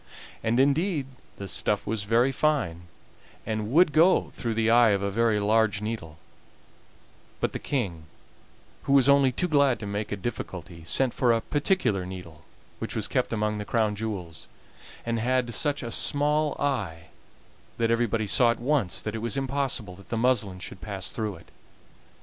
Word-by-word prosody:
And 115 +3 +1
indeed 145 +3 +2 0.3
the 100 - -6
stuff 70 -7 -1
was 105 -2 -2
very 120 +5 +3
fine, 125 - 0 0.6
and 110 0 -3
would 165 +2 +5
go 165 +5 +4
through 115 -3 -3
the 115 0 +2
eye 120 -1 +6
of 100 -1 +1
a 100 - -1
very 110 0 +2
large 105 0 +2
needle; 105 -7 -5 1.2
but - - -1
the - - -3
King, 95 - -3 0.8
who 140 - +1
was 135 -2 +5
only 140 -2 +5
too 180 +8 -1
glad 140 -5 +3
to 105 - -6
make 100 +1 -4
a - - 0
difficulty, 90 -6 -6
sent 130 +7 +2
for 125 -2 +2
a 115 - +3
particular 145 - 0
needle, 90 -4 -9 0.4
which - - -5
was - - 0
kept - - 0
among 105 -1 -1
the - - -3
Crown 110 0 0
jewels, 95 -7 -4 0.6
and 115 -1 -1
had 125 0 0
such 145 +1 0
a 115 - -5
small 150 +3 +1
eye 100 -13 -2 0.7
that 115 0 +1
everybody 115 -2 +1
saw 120 +4 +4
at 115 - 0
once 120 - 0
that 110 - -3
it 110 - -3
was 115 +4 0
impossible 135 -7 -1
that 100 - -16
the 115 - -2
muslin 110 -6 +1
should 90 -1 -9
pass 95 +1 -5
through 105 -3 -3
it. 80 - -16
115 Hz, 175 wpm, -26 LUFS, 100-135 Hz, 1.2 s, eye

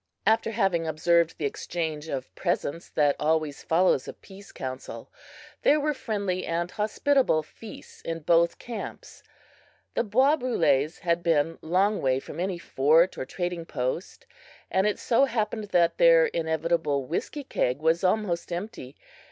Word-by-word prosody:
After 225 +1 +3
having 195 -7 0
observed 165 +1 +2
the 150 - -3
exchange 160 +1 -3
of 135 -4 -5
presents 170 -2 -2
that 145 -2 +2
always 155 -1 0
follows 165 -4 +2
a - - -6
"peace 200 0 -15
council," 130 -3 -7 0.5
there 300 - +4
were 300 +1 0
friendly 200 -8 -2
and 170 +1 -2
hospitable 215 - +1
feasts 215 +8 -13
in 165 0 -4
both 170 +2 +3
camps. 235 -2 -8 0.7
The - - +1
bois 260 +8 +3
brules 165 - +1
had 170 -2 +1
been 165 -1 +1
long 195 +6 +2
away 130 -1 +1
from 135 - -9
any 185 0 -1
fort 160 +2 +3
or 130 - -5
trading 175 -2 -4
post, 130 +6 -4 0.5
and 190 +2 +2
it 210 - 0
so 245 +4 +3
happened 220 -4 -2
that 175 -4 +2
their - - +7
inevitable 160 - -1
whiskey 230 - -4
keg 125 - -1
was 160 +3 +1
almost 185 -3 0
empty. 170 - -6
170 Hz, 145 wpm, -26 LUFS, 155-210 Hz, 0.7 s, their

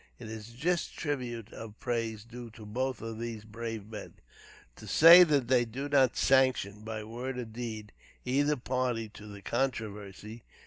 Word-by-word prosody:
It 115 -3 -9
is 110 0 -8
a 120 - -16
just 175 +5 -1
tribute 120 -7 -4
of 110 -1 -9
praise 115 -3 -2
due 120 +1 -9
to 110 - -10
both 125 +2 -2
of 115 -1 -5
these 115 -2 -5
brave 115 -1 -6
men, 105 -2 -8 0.6
to - - -11
say 170 +3 +10
that 145 -7 +2
they 125 -1 +4
do 125 +5 -5
not 135 -3 +3
sanction, 130 -6 +3
by 110 -1 -5
word 125 +4 -5
or 125 - -3
deed, 110 -2 -6 0.3
either 145 +4 +2
party 125 -3 -1
to 105 0 -12
the 100 -1 -10
controversy. 110 -3 -3
115 Hz, 170 wpm, -30 LUFS, 110-130 Hz, 0.6 s, say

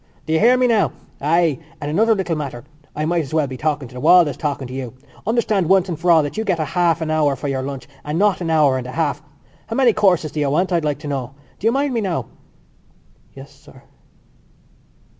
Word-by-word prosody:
"Do 160 - -2
you 160 - +3
hear 245 +3 +5
me 250 - +3
now?... 225 -4 +2 0.3
Ay 160 0 +2 0.2
and 145 0 -4
another 220 +7 +3
little 185 -4 -2
matter! 140 -5 -5 0.3
I 155 - -1
might 170 +1 +1
as 150 0 -6
well 155 -2 +2
be 130 -1 -6
talking 145 +1 -2
to 125 - -16
the 125 - -7
wall 175 +3 +6
as 140 - -4
talking 145 -3 -3
to 125 - -9
you. 130 -2 -6 0.3
Understand 215 -6 +1
once 190 -1 +3
for 170 +2 -2
all 165 -2 +6
that 145 - -5
you 220 - 0
get 190 -5 0
a 155 - 0
half 170 +2 +1
an 160 -1 -2
hour 150 -3 +2
for 135 +2 -5
your 135 -1 -1
lunch 135 0 -6 0.2
and 150 +2 -3
not 195 -1 +2
an 170 - -2
hour 150 -5 +3
and 125 - -7
a 130 - -7
half. 150 -2 -1 0.5
How 225 - -4
many 250 -3 +4
courses 180 -8 +2
do 155 - -4
you 145 -2 +1
want, 180 +7 +1
I'd 170 -2 +1
like 150 -2 -1
to - - -7
know.... 135 -2 -4 0.2
Do 215 - 0
you - - +4
mind 275 +1 0
me, 230 - 0
now?" 185 -5 -2 1.1
"Yes, 135 +1 -11
sir." 140 -2 -18
155 Hz, 240 wpm, -20 LUFS, 140-185 Hz, 1.1 s, wall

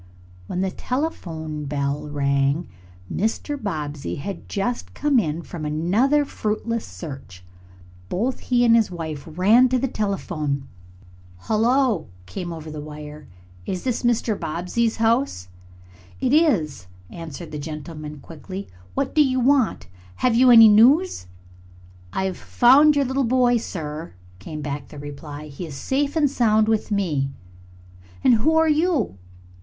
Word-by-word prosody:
When 180 - -2
the 190 -1 0
telephone 160 - -4
bell 140 +1 -2
rang 140 +2 0 0.5
Mr. 225 +8 -1
Bobbsey 150 - -4
had 195 +7 -7
just 235 +5 -3
come 290 -3 +3
in 165 -4 -2
from 160 -1 -7
another 200 - +2
fruitless 225 0 -2
search. 135 - -9 0.7
Both 240 +8 -1
he 245 -1 +2
and 230 -1 +6
his 225 -2 +3
wife 160 -5 -6
ran 210 +10 +4
to 255 - +2
the 270 - 0
telephone. 165 - -2 0.7
"Hullo!" 230 - +2 0.2
came 175 - -6
over 160 -1 -7
the 150 -1 -6
wire. 150 0 -9 0.4
"Is 185 -2 -3
this 250 -3 -1
Mr. 240 -2 +1
Bobbsey's 180 +8 -1
house?" 225 - 0 0.7
"It 260 0 +1
is," 185 - +2 0.2
answered 165 0 -8
the 150 - -5
gentleman 150 0 -7
quickly. 185 +5 -8 0.3
"What 275 -1 -1
do 305 - +5
you 260 -2 +1
want? 255 -2 +2 0.3
Have 250 - +1
you 250 +2 +5
any 225 -2 +10
news?" 245 - +4 0.8
"I've 190 - -2
found 285 +5 +5
your 285 -1 +2
little 265 +2 0
boy, 245 0 +3
sir," 160 -7 -6 0.3
came 150 +10 -7
back 145 -1 -4
the 150 - -12
reply. 145 +1 -8
"He 150 +5 -7
is 145 - -8
safe 280 - -1
and 305 -3 +4
sound 220 -5 +2
with 220 0 0
me." 165 -10 0 0.9
"And - - +6
who 315 +6 +3
are 320 0 +4
you?" 305 - +1
195 Hz, 140 wpm, -23 LUFS, 150-250 Hz, 0.9 s, any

